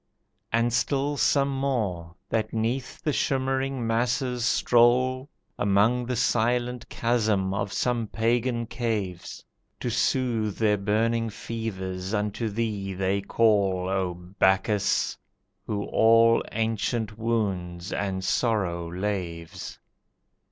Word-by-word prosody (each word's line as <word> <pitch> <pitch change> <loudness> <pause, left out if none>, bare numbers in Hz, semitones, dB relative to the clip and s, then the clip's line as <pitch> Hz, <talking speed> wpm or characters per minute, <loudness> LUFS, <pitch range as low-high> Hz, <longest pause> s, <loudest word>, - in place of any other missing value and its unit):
And 115 +1 +2
still 140 +3 +1
some 140 -1 +2
more, 105 -12 -2
that 110 0 -1
'neath 115 +4 -2
the 150 - 0
shimmering 135 -2 0
masses 125 +2 0
stroll, 125 +3 +3 0.3
Among 105 +5 +2
the 125 - -1
silent 120 +1 0
chasm 110 -5 +1
of 100 -1 -2
some 120 0 0
pagan 115 +2 0
caves, 105 -7 -4 0.3
To - - -2
soothe 115 -5 0
their 105 -2 +2
burning 115 +3 +1
fevers 100 -3 -4
unto 105 +2 -1
thee 100 -3 -3
they 95 +1 0
call 100 -4 +2
O 95 -2 -1
Bacchus! 95 +3 +1 0.5
who 105 -2 -2
all 115 +1 +5
ancient 110 0 -1
wounds 95 -6 -2
and 95 -2 -2
sorrow 95 -7 0
laves. 90 -4 -4
110 Hz, 105 wpm, -26 LUFS, 95-120 Hz, 0.5 s, all